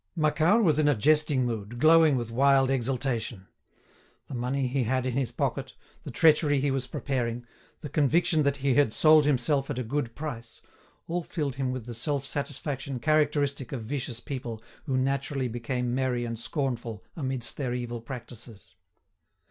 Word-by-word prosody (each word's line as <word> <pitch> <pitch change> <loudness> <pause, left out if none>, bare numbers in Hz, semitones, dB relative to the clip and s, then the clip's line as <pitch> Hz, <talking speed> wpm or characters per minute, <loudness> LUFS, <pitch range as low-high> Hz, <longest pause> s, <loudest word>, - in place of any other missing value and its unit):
Macquart 160 +7 +3
was 155 -5 +3
in 150 - +3
a 145 - +4
jesting 150 +2 +3
mood, 115 -1 -4
glowing 155 0 +5
with 120 -2 -4
wild 135 +2 +4
exultation. 120 -5 -2 0.8
The - - -7
money 130 +2 -1
he 130 0 0
had 130 +2 0
in 130 - -1
his 130 -1 -1
pocket, - - -2 0.3
the - - -7
treachery 150 -2 +4
he 140 +1 +1
was 135 -1 -2
preparing, 120 -3 -3 0.4
the 155 - -5
conviction 155 +3 +2
that 140 -1 +1
he 135 - +4
had 140 -5 +3
sold 155 -1 +6
himself 135 0 +1
at 145 - -3
a 125 - -1
good 120 0 -3
price—all 145 +5 -7
filled 150 -4 -3
him 130 -2 -1
with 130 -3 -5
the 120 - -6
self 140 +3 -2
satisfaction 140 -1 -4
characteristic 145 -2 +1
of 125 -5 -4
vicious 120 -1 -4
people 120 -4 -6 0.2
who 135 -4 0
naturally 135 0 -1
became 120 +1 -2
merry 125 -2 0
and 115 -1 -5
scornful 120 -5 -3
amidst 130 -6 -3
their 125 -4 -2
evil 120 -1 -4
practices. 115 -4 -10
135 Hz, 165 wpm, -27 LUFS, 120-145 Hz, 0.8 s, sold